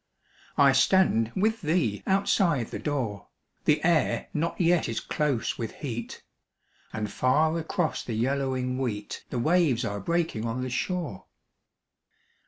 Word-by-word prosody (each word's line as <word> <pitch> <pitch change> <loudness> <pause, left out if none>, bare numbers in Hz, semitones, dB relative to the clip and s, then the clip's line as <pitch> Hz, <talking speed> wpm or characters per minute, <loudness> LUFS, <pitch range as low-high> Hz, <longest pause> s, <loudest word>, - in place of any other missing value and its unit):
I 140 -1 +6
stand 135 - +3
with 220 +4 +1
thee 155 - 0
outside 190 - +2
the - - -4
door, 125 -9 -3 0.4
The 150 - +3
air 165 -3 +2
not 165 +3 -2
yet 175 -4 +3
is 115 - -2
close 145 -6 -1
with 115 -2 -4
heat, 120 -5 -6 0.7
And 105 -1 -3
far 155 +5 +2
across 165 0 -1
the 115 - -4
yellowing 130 +1 -1
wheat 105 -6 -4
The - - -3
waves 145 -3 +2
are 100 0 -3
breaking 165 - -1
on 115 +2 -2
the 130 - -4
shore. 170 - -3
140 Hz, 135 wpm, -27 LUFS, 115-170 Hz, 0.7 s, I